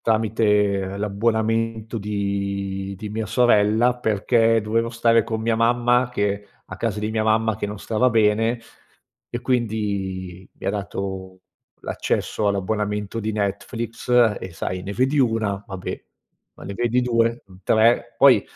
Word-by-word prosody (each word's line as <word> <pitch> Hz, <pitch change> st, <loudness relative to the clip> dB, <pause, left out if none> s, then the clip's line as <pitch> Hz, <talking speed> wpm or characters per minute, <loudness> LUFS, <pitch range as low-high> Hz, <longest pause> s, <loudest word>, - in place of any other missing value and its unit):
tramite 105 Hz, -3 st, +1 dB
l'abbonamento 110 Hz, +2 st, -1 dB
di 100 Hz, -1 st, -3 dB
di 105 Hz, +2 st, -6 dB
mia 110 Hz, 0 st, -3 dB
sorella, 115 Hz, +1 st, +3 dB
perché 115 Hz, +1 st, +2 dB
dovevo 115 Hz, +2 st, 0 dB
stare 115 Hz, -1 st, +3 dB
con 110 Hz, -1 st, -3 dB
mia 115 Hz, 0 st, +1 dB
mamma 120 Hz, +2 st, +3 dB
che 105 Hz, -2 st, -1 dB, 0.2 s
a 95 Hz, -, -9 dB
casa 105 Hz, 0 st, -2 dB
di 105 Hz, +1 st, -2 dB
mia 110 Hz, 0 st, 0 dB
mamma 110 Hz, -1 st, +2 dB
che 105 Hz, -, -3 dB
non 105 Hz, 0 st, -6 dB
stava 115 Hz, +5 st, +1 dB
bene. 115 Hz, +1 st, +2 dB, 0.7 s
E 120 Hz, -, -4 dB
quindi, 100 Hz, -7 st, -2 dB
mi -, -, -10 dB
ha -, -, +3 dB
dato 95 Hz, -2 st, -5 dB, 0.4 s
l'accesso 105 Hz, -, -2 dB
all'abbonamento 105 Hz, +2 st, -2 dB
di 110 Hz, +1 st, -2 dB
Netflix. 110 Hz, +4 st, -4 dB, 0.3 s
E 95 Hz, -, -7 dB
sai, 90 Hz, +2 st, -4 dB
ne 100 Hz, +1 st, -5 dB
vedi 130 Hz, +5 st, +1 dB
una, 110 Hz, -5 st, +1 dB
va 95 Hz, -, -6 dB
beh, 90 Hz, -, -6 dB, 0.5 s
ma -, -, -13 dB
ne 100 Hz, -, -5 dB
vedi 120 Hz, +3 st, +1 dB
2-3, 115 Hz, -1 st, +1 dB
poi 125 Hz, -5 st, +6 dB
110 Hz, 140 wpm, -22 LUFS, 100-115 Hz, 0.7 s, poi